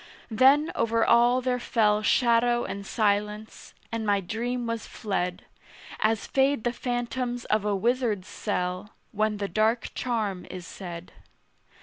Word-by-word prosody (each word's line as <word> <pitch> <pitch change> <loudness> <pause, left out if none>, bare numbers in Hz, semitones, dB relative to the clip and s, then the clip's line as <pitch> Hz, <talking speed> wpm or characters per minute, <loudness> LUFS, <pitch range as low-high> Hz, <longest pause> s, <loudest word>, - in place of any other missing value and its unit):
Then 270 +7 +5
over 230 0 +1
all 240 +2 +4
there 250 0 0
fell 215 -4 +2
Shadow 240 +1 +3
and 200 0 -6
silence; 210 0 -1 0.2
and 230 -1 -2
my 205 -2 +2
dream 235 +6 -3
was 230 -1 -4
fled, 180 -5 -3 0.5
As 220 0 +1
fade 270 -3 +1
the 240 - 0
phantoms 245 0 -3
of 215 -1 0
a 205 -1 +1
wizard's 225 -2 0
cell 185 0 -3 0.2
When 215 0 0
the 200 -1 -2
dark 220 +5 +1
charm 215 -7 -2
is 180 -1 -7
said. 175 -3 -8
220 Hz, 135 wpm, -26 LUFS, 205-245 Hz, 0.5 s, Then